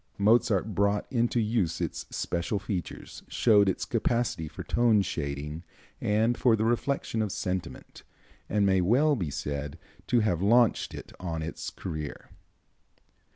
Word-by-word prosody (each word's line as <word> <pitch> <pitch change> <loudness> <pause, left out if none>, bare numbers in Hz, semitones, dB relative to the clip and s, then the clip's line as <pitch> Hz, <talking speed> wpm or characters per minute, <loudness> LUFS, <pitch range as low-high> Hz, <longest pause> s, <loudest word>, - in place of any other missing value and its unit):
Mozart 105 -1 +3
brought 100 +2 +1
into 120 -1 +1
use 105 -7 0
its - - -4
special 85 +4 -2
features, 95 -2 -5
showed 105 -4 +4
its 95 - -2
capacity 115 -9 0
for 75 - -8
tone 115 -4 +3
shading 75 -1 -4 0.4
and 110 +3 +2
for 120 -3 +4
the 110 0 0
reflection 120 -1 0
of 105 -2 -1
sentiment, 90 -1 -5 0.5
and 105 -1 +2
may 95 -1 +3
well 135 - +3
be 90 - -2
said 70 +1 -4 0.3
to 120 -2 +3
have 90 -6 0
launched 115 +3 +3
it - - -10
on 80 -3 -3
its 80 - -5
career. 80 -5 -6
100 Hz, 140 wpm, -28 LUFS, 85-115 Hz, 0.5 s, showed